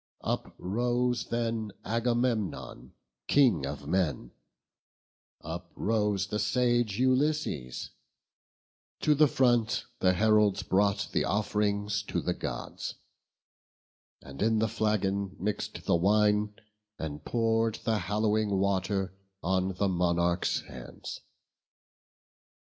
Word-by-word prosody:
Uprose 120 +5 -1
then 115 -3 -2
Agamemnon, 115 - -1 0.3
King 115 - +4
of 70 0 -6
men, 80 -6 0 1.1
Uprose 100 +5 -1
the 105 +1 -3
sage 120 -5 +1
Ulysses; 130 - 0 1.1
to 150 - +4
the 150 +1 +5
front 120 -4 +2
The 90 -1 +4
heralds 105 0 +3
brought 100 +1 +1
the - - +1
off'rings 105 -1 0
to - - -1
the 90 - -1
Gods, - - -5 1.3
And 70 0 -9
in 110 +1 +3
the 110 +1 +2
flagon 100 -3 0
mix'd 105 +3 -3
the - - +3
wine, 105 +3 +3 0.4
and 75 -2 -5
pour'd 115 -1 +1
The 110 -2 +1
hallowing 105 +2 +1
water 95 0 0 0.3
on 95 +1 0
the 100 +2 +1
monarchs' 85 -1 +1
hands. - - -9
105 Hz, 100 wpm, -29 LUFS, 95-115 Hz, 1.3 s, the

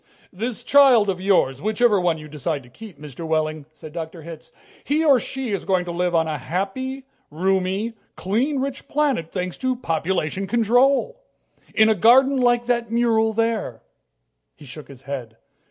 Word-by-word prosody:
"This 235 +5 -4
child 255 -6 +5
of 185 -1 -7
yours 145 -9 +2
whichever 215 0 +2
one 175 -2 +1
you 155 -1 -10
decide 150 -1 -4
to 125 - -17
keep, 195 - -12
Mr. 150 +1 -9
Wehling," 155 -2 -2
said 155 0 -12
Dr. 165 -1 -7
Hitz. 165 -1 -10 0.3
"He 310 +3 0
or 275 -4 +5
she 265 -1 -4
is 200 - -2
going 185 -2 0
to 175 - -5
live 175 0 -1
on 160 -1 +2
a 155 -2 -3
happy, 200 - -4 0.3
roomy, 190 +6 -1 0.2
clean, 245 +10 -1
rich 270 0 -4
planet, 275 - 0
thanks 180 -2 -4
to 260 -1 0
population 180 - -2
control. 250 - +2 0.5
In 220 - +5
a 220 - +4
garden 260 +7 +5
like 240 -1 +2
that 235 -1 -1
mural 230 -1 +2
there." 220 - -2 0.7
He 150 - -15
shook 145 +3 -11
his 135 -2 -14
head. 125 -5 -7
195 Hz, 170 wpm, -22 LUFS, 160-240 Hz, 0.7 s, child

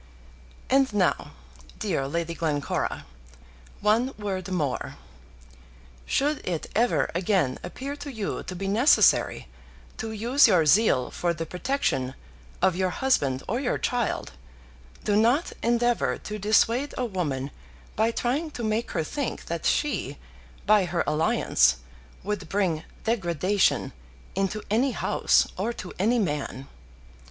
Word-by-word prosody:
And 270 -1 +3
now, 185 -4 +1 0.4
dear 135 - -1
Lady 170 +3 -2
Glencora, 150 -4 -2 0.8
one 230 +6 +2
word 195 -3 -4
more. 155 -8 -2 1.1
Should 295 +1 +1
it 170 -4 -2
ever 240 +2 +2
again 175 -7 +1
appear 270 +10 -6
to 285 0 -7
you 220 -5 -3
to 185 - -6
be 195 +2 -4
necessary 230 +9 +4 0.5
to 220 0 -4
use 240 +6 +4
your 180 -7 +4
zeal 150 - +4
for 175 -1 -1
the 165 +1 -4
protection 180 - -1 0.5
of 185 - +4
your 185 0 +1
husband 145 - +1
or 235 +5 -1
your 265 -2 0
child, 245 -3 -1 0.7
do 205 - +1
not 240 +9 +3
endeavour 240 0 +1
to 210 0 -6
dissuade 230 +6 +2
a 255 - 0
woman 145 - -3 0.4
by 220 +2 +2
trying 260 +7 -1
to 240 - -4
make 220 +2 -1
her 165 - 0
think 275 - -4
that 170 -1 -2
she, 145 - 0 0.5
by 210 -2 +5
her 175 0 -1
alliance, 150 - +3 0.5
would 190 -4 -4
bring 180 -6 0 0.2
degradation 195 -3 +1 0.4
into 195 +2 -1
any 250 +4 +2
house, - - +2
or 235 - 0
to 185 - -8
any 225 +6 +3
man. 145 - -2
205 Hz, 130 wpm, -26 LUFS, 170-235 Hz, 1.1 s, by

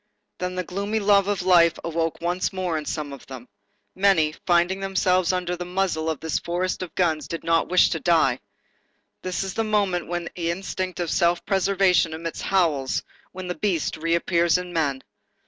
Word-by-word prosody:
Then 180 0 -3
the 185 - -2
gloomy 200 +5 -2
love 200 -1 +4
of 205 -3 -1
life 170 -2 +5
awoke 165 -1 -2
once 175 +2 -1
more 185 -3 -2
in 155 -1 -3
some 150 -2 -4
of 140 - -12
them. 130 -2 -9 0.5
Many, 185 -6 +3
finding 175 +2 +3
themselves 185 -2 +1
under 180 -1 -1
the 175 - -5
muzzles 180 -3 -1
of 160 - -2
this 160 -1 -1
forest 180 +2 -2
of 185 - -7
guns, 160 -5 0
did 165 - -5
not 165 0 +1
wish 185 +1 +4
to 165 - -1
die. 155 -7 +3 0.8
This 185 0 -2
is 190 -1 -5
a - - +3
moment 200 -5 0
when 175 0 -3
the 170 -2 -2
instinct 185 +1 -3
of 175 -2 -2
self 175 -1 +2
preservation 190 -3 +2
emits 165 +1 -5
howls, 160 -9 +1 0.3
when 185 0 -7
the 180 - -2
beast 180 -5 -1
reappears 170 +1 +2
in 180 -1 -6
men. 140 -5 -1
175 Hz, 180 wpm, -24 LUFS, 165-185 Hz, 0.8 s, life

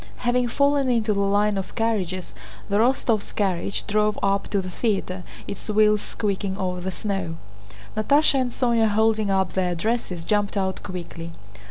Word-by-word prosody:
Having 245 0 +2
fallen 280 +2 +2
into 225 -3 +2
the 200 - -1
line 200 +1 +2
of 190 - -7
carriages, 190 -5 -1 0.4
the 200 - +2
Rostóvs' 230 -2 +1
carriage 195 -2 -1
drove 210 0 +1
up 195 0 +1
to 200 - 0
the 185 -1 -4
theater, 190 -3 -1 0.2
its 200 - -6
wheels 210 0 +4
squeaking 195 -2 -2
over 180 -1 -2
the 190 +1 -3
snow. 190 -4 -3 0.6
Natásha 280 +4 +4
and 250 -1 -1
Sónya, 235 -3 +2
holding 220 0 +2
up 190 -1 +1
their 180 -2 0
dresses, 185 -3 -2
jumped 205 +2 0
out 190 -1 -1
quickly. 170 -3 -7
205 Hz, 160 wpm, -24 LUFS, 190-225 Hz, 0.6 s, wheels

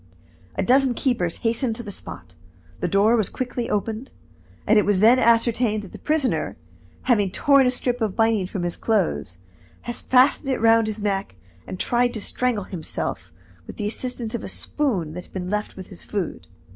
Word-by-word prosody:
A - - 0
dozen 260 0 +4
keepers 225 - 0
hastened 230 +1 +1
to 240 - -5
the 205 - -6
spot. 90 - -9 0.5
The - - -1
door 205 +4 +4
was 215 -5 +1
quickly 250 -2 -3
opened, 220 +4 -2 0.5
and 215 +1 +5
it - - +3
was 205 -2 +2
then 230 +5 +6
ascertained 230 -2 +3
that 195 - -11
the - - -10
prisoner, 305 -4 0 0.5
having 210 -6 +3
torn 275 +7 +4
a - - +4
strip 245 -1 -2
of 215 -4 0
binding 225 -4 +2
from 190 -1 -4
his 175 -1 -2
clothes, 85 - 0 0.4
had 240 - -4
fastened 265 +2 +3
it 260 - 0
round 225 0 +4
his 215 -1 -3
neck 195 - -1 0.3
and 185 - -6
tried 245 0 +1
to - - -2
strangle 245 -2 0
himself 155 - -5 0.4
with - - -9
the 205 - -2
assistance 240 0 -3
of 235 - -3
a - - -5
spoon 200 - -1
that 180 +1 -7
had - - -23
been 185 0 -4
left 210 0 -2
him - - -26
with 185 - -9
his 185 - -8
food. 200 -5 -4
220 Hz, 195 wpm, -23 LUFS, 195-245 Hz, 0.5 s, then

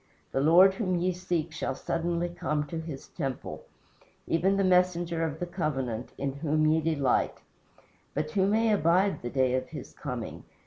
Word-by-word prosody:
The 135 - 0
Lord 175 +6 +7
whom 190 -2 -1
ye 180 +1 +1
seek 170 -2 -2
shall 155 -4 -3
suddenly 170 +3 -1
come 150 -3 -2
to 160 +3 -5
his 160 -4 -7
temple: 135 -6 -5 0.6
Even 190 +4 +2
the 195 - +2
messenger 175 -2 +2
of 160 -1 -3
the 175 - -1
covenant, 135 - -3
in 140 -1 -2
whom 155 +2 +1
ye 155 +1 +3
delight; 150 -5 +1 0.8
But 155 +1 -1
who 190 +3 +2
may 220 +2 +3
abide 185 +2 +2
the 120 - -4
day 130 0 +2
of 130 0 -1
his - - -8
coming? - - -6
165 Hz, 170 wpm, -28 LUFS, 145-180 Hz, 0.8 s, Lord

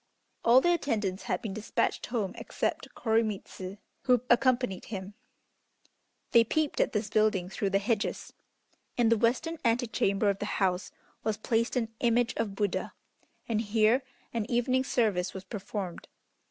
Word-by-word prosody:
All 245 +3 +7
the 350 +3 +4
attendants 215 - -1
had - - 0
been 210 -4 -3
despatched 215 +2 -1
home 215 -5 -2
except - - -3
Koremitz, 215 -4 -1 0.3
who 250 -3 +4
accompanied 250 -5 +2
him. 195 -1 -6 1.2
They 235 - +7
peeped 305 +5 0
at - - +2
this 210 -1 -1
building 210 -5 +2
through 195 +1 -1
the 195 - +3
hedges. 210 +1 -1 0.6
In 235 -2 +4
the 230 - +5
western 255 +8 +1
antechamber 225 -4 +2
of 195 - -6
the 205 - -3
house 185 -1 0 0.3
was 220 -1 0
placed 230 +2 0
an 225 -3 -1
image 240 0 +2
of 210 -3 -2
Buddha, 205 -2 -1 0.5
and 220 -2 +1
here 220 +3 +3 0.3
an 225 -1 -2
evening 255 +2 +2
service 210 -9 0
was 190 - -6
performed. 195 -2 -5
220 Hz, 145 wpm, -29 LUFS, 200-240 Hz, 1.2 s, All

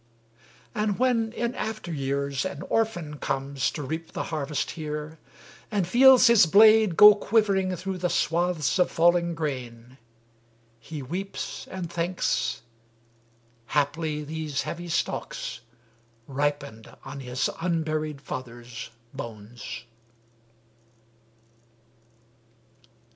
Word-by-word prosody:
And 210 -2 0
when 235 -3 +2
in 235 +1 -2
after 215 -8 -4
years 140 -1 -1
an 145 +5 -5
orphan 175 -10 -1
comes 135 -1 -1
To 150 - -6
reap 160 +4 -5
the - - -2
harvest 150 -1 -2
here, 150 0 -6 0.5
and 200 -5 0
feels 255 +5 +7
his 235 -8 +7
blade 215 0 +6
Go 210 0 +11
quivering 200 -3 +1
through 185 +1 -4
the 180 0 0
swaths 170 0 +1
of 180 - +4
falling 170 0 +3
grain, 130 -5 -5 0.8
He 145 +5 -7
weeps 185 +9 -5
and 185 -2 -5
thinks 170 -11 -1 1.0
haply 150 +2 0
these 150 -1 -3
heavy 175 +1 -5
stalks - - -3 0.7
Ripened 140 -4 -3
on 135 +1 -7
his 125 -1 -1
unburied 155 -4 -1
father's 120 -3 -7 0.2
bones. 115 +1 -8
160 Hz, 100 wpm, -26 LUFS, 140-185 Hz, 1.0 s, Go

